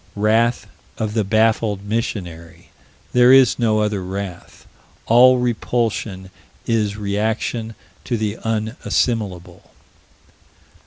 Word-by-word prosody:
Wrath 110 Hz, +3 st, +1 dB, 0.3 s
of 110 Hz, -1 st, -3 dB
the 110 Hz, -1 st, +1 dB
baffled 110 Hz, -1 st, +1 dB
missionary. 90 Hz, -7 st, -5 dB, 0.4 s
There 125 Hz, 0 st, +6 dB
is 135 Hz, -1 st, +5 dB
no 110 Hz, -2 st, +2 dB
other 105 Hz, -3 st, -1 dB
wrath. 95 Hz, -1 st, -7 dB, 0.4 s
All 125 Hz, +2 st, +6 dB
repulsion 115 Hz, -5 st, -2 dB, 0.3 s
is 105 Hz, -3 st, 0 dB
reaction 110 Hz, +2 st, -2 dB, 0.3 s
to 120 Hz, -, -1 dB
the 105 Hz, -1 st, -3 dB
unassimilable. 110 Hz, -, -2 dB
110 Hz, 95 wpm, -20 LUFS, 100-115 Hz, 0.4 s, There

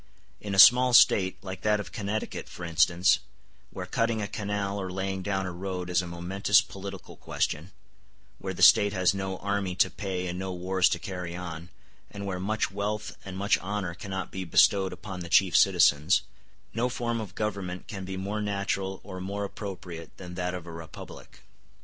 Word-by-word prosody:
In 100 Hz, -2 st, -4 dB
a -, -, -3 dB
small 125 Hz, +5 st, +8 dB
State, 95 Hz, -5 st, +6 dB
like 95 Hz, -1 st, -6 dB
that 105 Hz, -1 st, +2 dB
of 105 Hz, -, -6 dB
Connecticut 110 Hz, -1 st, -4 dB
for 90 Hz, -, -9 dB
instance, 85 Hz, +2 st, +3 dB, 0.5 s
where -, -, -6 dB
cutting 115 Hz, -1 st, 0 dB
a 105 Hz, -, -2 dB
canal 100 Hz, -1 st, -3 dB
or 95 Hz, -1 st, -4 dB
laying 95 Hz, +1 st, -3 dB
down 95 Hz, 0 st, -1 dB
a 90 Hz, -, -3 dB
road 90 Hz, 0 st, -5 dB
is 90 Hz, 0 st, +3 dB
a 90 Hz, -, -7 dB
momentous 95 Hz, +4 st, +2 dB
political 95 Hz, -1 st, -7 dB
question, 80 Hz, +5 st, -2 dB, 0.7 s
where -, -, -5 dB
the -, -, 0 dB
State 100 Hz, 0 st, +7 dB
has 95 Hz, -2 st, +3 dB
no 95 Hz, -1 st, -3 dB
army 100 Hz, -2 st, -2 dB
to 95 Hz, -, +3 dB
pay 95 Hz, -3 st, -4 dB
and 90 Hz, 0 st, -4 dB
no 95 Hz, -1 st, -3 dB
wars 90 Hz, +1 st, +2 dB
to -, -, 0 dB
carry 90 Hz, -1 st, -6 dB
on, 85 Hz, -1 st, -7 dB, 0.4 s
and 100 Hz, -1 st, -7 dB
where 95 Hz, -2 st, -3 dB
much 105 Hz, +2 st, -1 dB
wealth 105 Hz, +2 st, -3 dB
and 95 Hz, -1 st, -7 dB
much 100 Hz, +1 st, +2 dB
honor 95 Hz, -2 st, -3 dB
cannot 95 Hz, +1 st, -5 dB
be 95 Hz, -, -4 dB
bestowed 95 Hz, +3 st, +4 dB
upon 95 Hz, -2 st, -7 dB
the 85 Hz, -1 st, -7 dB
chief 95 Hz, -1 st, +4 dB
citizens, 85 Hz, -3 st, +5 dB, 0.5 s
no 120 Hz, +2 st, 0 dB
form 120 Hz, -2 st, -2 dB
of 105 Hz, -, -8 dB
government 100 Hz, -4 st, -3 dB
can 95 Hz, -4 st, -6 dB
be 95 Hz, 0 st, -5 dB
more 100 Hz, +3 st, -3 dB
natural 100 Hz, -2 st, -2 dB
or 95 Hz, -2 st, -8 dB
more 100 Hz, +2 st, -3 dB
appropriate 90 Hz, -5 st, -7 dB
than 90 Hz, -1 st, -9 dB
that 90 Hz, 0 st, -2 dB
of 90 Hz, -2 st, -7 dB
a 85 Hz, -, -8 dB
republic. 80 Hz, -1 st, -11 dB
95 Hz, 185 wpm, -28 LUFS, 90-100 Hz, 0.7 s, small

